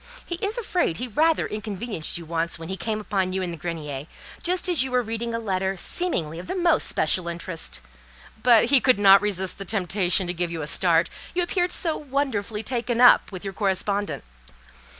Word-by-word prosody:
He 345 Hz, -, -4 dB
is 415 Hz, +4 st, 0 dB
afraid 365 Hz, -, -1 dB
he 250 Hz, -, -3 dB
rather 315 Hz, +8 st, +2 dB
inconvenienced 210 Hz, -5 st, -2 dB
you 170 Hz, -, -8 dB
once 165 Hz, +1 st, -1 dB
when 165 Hz, 0 st, -9 dB
he 190 Hz, -, -2 dB
came 215 Hz, +2 st, -3 dB
upon 190 Hz, -3 st, -1 dB
you 190 Hz, 0 st, -1 dB
in 175 Hz, -, -3 dB
the -, -, -5 dB
grenier, 155 Hz, -4 st, -5 dB, 0.3 s
just 365 Hz, +1 st, +1 dB
as 350 Hz, -6 st, +5 dB
you 265 Hz, -, -4 dB
were 250 Hz, -1 st, +1 dB
reading 230 Hz, +1 st, -4 dB
a -, -, -2 dB
letter 190 Hz, -3 st, -2 dB
seemingly 170 Hz, -, -1 dB
of 180 Hz, -, -9 dB
the -, -, -3 dB
most 345 Hz, -3 st, +2 dB
special 170 Hz, +3 st, 0 dB
interest; 170 Hz, -, -3 dB, 0.6 s
but 235 Hz, -1 st, +6 dB
he 270 Hz, -, +7 dB
could 255 Hz, -1 st, +4 dB
not 195 Hz, -1 st, +7 dB
resist 190 Hz, -2 st, -1 dB
the -, -, -3 dB
temptation 190 Hz, -1 st, 0 dB
to 175 Hz, -, -3 dB
give 175 Hz, 0 st, -2 dB
you 165 Hz, -2 st, -4 dB
a -, -, -3 dB
start, 170 Hz, +2 st, +2 dB, 0.2 s
you 355 Hz, -, +2 dB
appeared 355 Hz, 0 st, 0 dB
so 330 Hz, -4 st, 0 dB
wonderfully 255 Hz, -7 st, -2 dB
taken 240 Hz, 0 st, -2 dB
up 245 Hz, -3 st, +6 dB
with 185 Hz, -1 st, -8 dB
your 195 Hz, -1 st, -5 dB
correspondent. 200 Hz, +1 st, -1 dB
200 Hz, 200 wpm, -24 LUFS, 175-250 Hz, 0.6 s, he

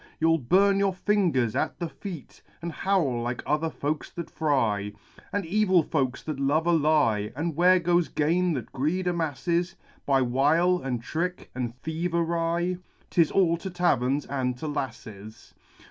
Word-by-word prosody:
You'll 165 Hz, 0 st, +3 dB
burn 195 Hz, +9 st, +3 dB
your 195 Hz, -2 st, +1 dB
fingers 180 Hz, -, +1 dB
at -, -, -1 dB
the 170 Hz, -, -3 dB
feat, 170 Hz, -4 st, -9 dB, 0.2 s
And 170 Hz, +1 st, -5 dB
howl 160 Hz, -10 st, 0 dB
like 120 Hz, +1 st, -3 dB
other 155 Hz, +2 st, 0 dB
folks 150 Hz, 0 st, -3 dB
that 170 Hz, -, -7 dB
fry. 110 Hz, -10 st, 0 dB, 0.4 s
All 205 Hz, -3 st, -2 dB
evil 185 Hz, -1 st, +3 dB
folks 135 Hz, -5 st, -1 dB
that 155 Hz, -3 st, -4 dB
love 145 Hz, +4 st, +1 dB
a 175 Hz, -, +3 dB
lie! 150 Hz, -10 st, +2 dB
And 160 Hz, +2 st, -2 dB
where 180 Hz, +3 st, +5 dB
goes 175 Hz, 0 st, +2 dB
gain 170 Hz, +4 st, +1 dB
that 130 Hz, -, -5 dB
greed 160 Hz, +8 st, -1 dB
amasses, 170 Hz, +1 st, -1 dB, 0.3 s
By 135 Hz, -2 st, +3 dB
wile, 155 Hz, +9 st, +2 dB
and 125 Hz, -3 st, -3 dB
trick, 180 Hz, +7 st, -3 dB
and 125 Hz, -1 st, -4 dB
thievery? 170 Hz, +1 st, -1 dB, 0.3 s
'Tis 165 Hz, -3 st, +3 dB
all 170 Hz, -3 st, +2 dB
to 190 Hz, +3 st, -6 dB
taverns 145 Hz, -6 st, +1 dB
and 130 Hz, -2 st, -2 dB
to 155 Hz, -, -5 dB
lasses 110 Hz, -7 st, -7 dB
160 Hz, 155 wpm, -26 LUFS, 135-175 Hz, 0.4 s, where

